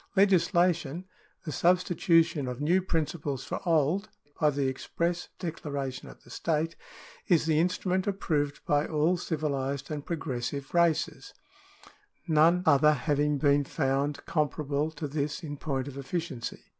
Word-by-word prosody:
Legislation 175 -4 +2 0.2
— - - -36
the 155 - -3
substitution 170 -3 +2
of 125 -1 -4
new 170 +6 +3
principles 155 -6 -2
for - - -4
old 165 +5 +2 0.3
by 150 - +4
the 140 -1 0
express 170 +6 -2
declara 145 -6 -4
tion 130 - -9
of - - -15
the - - -16
state 165 0 -1 0.3
— - - -21
is 170 -4 +3
the 155 -1 +2
instrument 185 +2 0
approved 150 -7 -1
by 145 0 +2
all 155 +3 +2
civilised 140 -5 -2
and 150 -2 -4
progressive 140 -4 -4
races, 170 -2 +1 0.9
none 165 +3 +4
other 150 -1 +5
having 145 +1 +1
been 145 0 +3
found 140 +2 -1
com 150 -3 +1
parable 145 +2 -2
to 150 - -4
this 145 +4 -3
in 145 -2 -5
point 135 -2 -3
of 140 -1 -7
efficiency. 140 -4 -4
155 Hz, 145 wpm, -28 LUFS, 140-170 Hz, 0.9 s, other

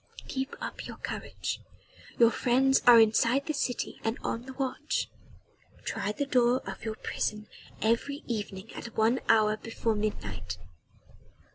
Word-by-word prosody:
"Keep 265 0 -3
up - - -5
your - - -8
courage. - - -4 0.6
Your 230 -1 +6
friends 265 +3 +3
are 240 -1 +10
inside 230 +5 +4
the 310 - -1
city 260 -3 -2
and 225 +2 0
on 235 +3 -3
the 265 - -7
watch. 275 +4 -2 0.7
Try 205 -2 -1
the 285 +7 -2
door 250 -2 +3
of - - -7
your 220 -1 -3
prison 210 0 -3 0.4
every 235 +6 +1
evening 205 -3 -4
at 235 - -8
one 225 +3 +4
hour 215 -1 +5
before 225 0 -1
midnight. 100 - -3
230 Hz, 140 wpm, -29 LUFS, 215-260 Hz, 0.7 s, are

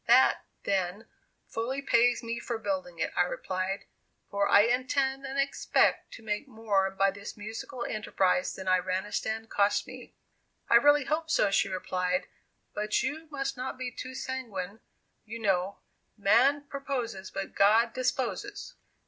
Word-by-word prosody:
"That, 250 +3 +5 0.2
then, 195 +2 -1 0.4
fully 245 +4 -3
pays 245 -3 +3
me 230 0 -3
for 235 -1 -3
building 275 +3 -3
it," - - -1
I - - +4
replied; 195 - -2 0.5
"for 200 0 +1
I 200 - +8
intend 265 +3 +1
and 270 +1 -5
expect 275 0 +2
to 225 - -11
make 215 +5 -2
more 215 -5 +1
by 195 +1 +2
this 200 +2 -9
musical 225 +4 -6
enterprise 190 -4 +1
than 190 - -7
Iranistan 190 +4 0
cost 205 -1 +2
me." - - -11 0.6
"I - - +9
really 290 +3 +5
hope 320 +1 -1
so," 210 -9 +3
she 195 0 +2
replied; 185 -1 -1 0.5
"but 210 +1 0
you 305 +5 -3
must 275 -2 -3
not 255 0 -4
be 255 -1 -4
too 255 +2 -7
sanguine, 220 -7 -4 0.4
you 225 +1 -7
know, 195 -3 0 0.4
'man 255 +8 +4
proposes 250 -8 -4
but 195 0 -5
God 225 +4 +4
disposes. 260 +11 -2
230 Hz, 145 wpm, -29 LUFS, 200-265 Hz, 0.6 s, I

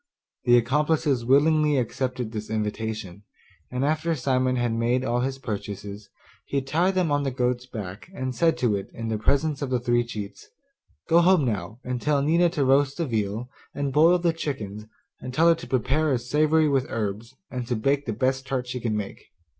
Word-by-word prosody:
The 120 0 +6
accomplices 145 +1 +1
willingly 150 +3 +4
accepted 125 -1 -2
this 110 -2 -6
invitation; 110 -3 -3 0.5
and 125 +2 -1
after 155 +2 0
Simon 130 -2 +1
had 120 -2 0
made 120 +3 +1
all 120 -1 0
his 135 +2 -2
purchases, 100 -3 -6 0.4
he 140 - 0
tied 170 +8 +1
them 180 -5 +1
on 145 0 +1
to 135 - 0
the 125 - -9
goat's 125 0 -1
back, 105 - -7
and 130 0 -3
said 165 +7 +2
to 115 -5 +1
it, 100 - -5
in 115 0 -4
the 110 -1 -1
presence 140 +5 +1
of 140 - -2
the 125 -1 +1
three 120 0 +2
cheats, 105 - -8 0.6
'Go 170 +1 +5
home 175 -4 +4
now, 105 -1 -3
and 125 -1 -3
tell 145 -2 +1
Nina 170 +4 +3
to 150 -5 0
roast 140 +1 +3
the 170 - 0
veal, 110 -1 -2 0.3
and 140 -2 -2
boil 165 +5 +6
the 170 -1 +1
chickens, 110 -10 -5 0.3
and 125 0 -7
tell 165 +4 +4
her - - +7
to 165 - -8
prepare 140 +5 +1
a 130 - +3
savoury 155 +5 +2
with 135 -3 +1
herbs, 110 +3 -4 0.2
and 125 -2 -4
to 120 - 0
bake 140 +5 0
the - - 0
best 130 +3 -1
tart 130 -1 -1
she 125 0 -4
can 110 -3 -1
make. 100 -2 -6
130 Hz, 200 wpm, -25 LUFS, 115-145 Hz, 0.6 s, her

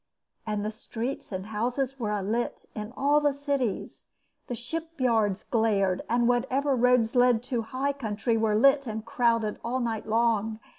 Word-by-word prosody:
And 210 -1 -1
the 215 - -2
streets 230 +4 -5
and 190 0 -4
houses 250 +5 -2
were 220 -3 -2
alight 210 +3 -2
in 215 +1 -6
all 285 +2 +4
the 290 -1 +2
cities, 280 -6 -3 0.4
the 245 - -3
shipyards 240 - -1
glared, 205 -5 +1
and 240 0 +2
whatever 265 +3 +1
roads 250 -2 +3
led 245 -2 +4
to 245 -2 -1
high 265 +5 -2
country 225 -3 -1
were 220 -1 +2
lit 275 +4 +4
and 220 0 -4
crowded 230 -2 +1
all 245 +2 -1
night 225 -3 -2
long. 225 -1 +1
235 Hz, 155 wpm, -27 LUFS, 215-260 Hz, 0.4 s, all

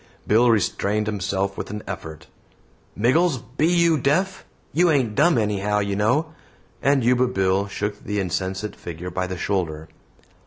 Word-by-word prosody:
Bill 115 +3 +4
restrained 105 -1 +1
himself 100 -1 -2
with - - -6
an 105 +1 -6
effort. 80 -5 -7 0.7
"Miggles! 135 - +3 0.2
Be 155 - +3
you 170 -2 +3
deaf? 185 +9 0 0.3
You 175 +2 +4
ain't 130 -8 +2
dumb 165 +6 +4
anyhow, 105 -1 0
you 100 -1 -1
know"; 130 +11 +1 0.5
and 140 -2 +3
Yuba 125 +1 +3
Bill 95 -2 +1
shook 105 +1 -4
the 105 0 -2
insensate 95 +2 -3
figure 90 +1 -7
by 90 +1 -2
the 90 0 -5
shoulder. 80 -5 -2
105 Hz, 150 wpm, -23 LUFS, 95-130 Hz, 0.7 s, Bill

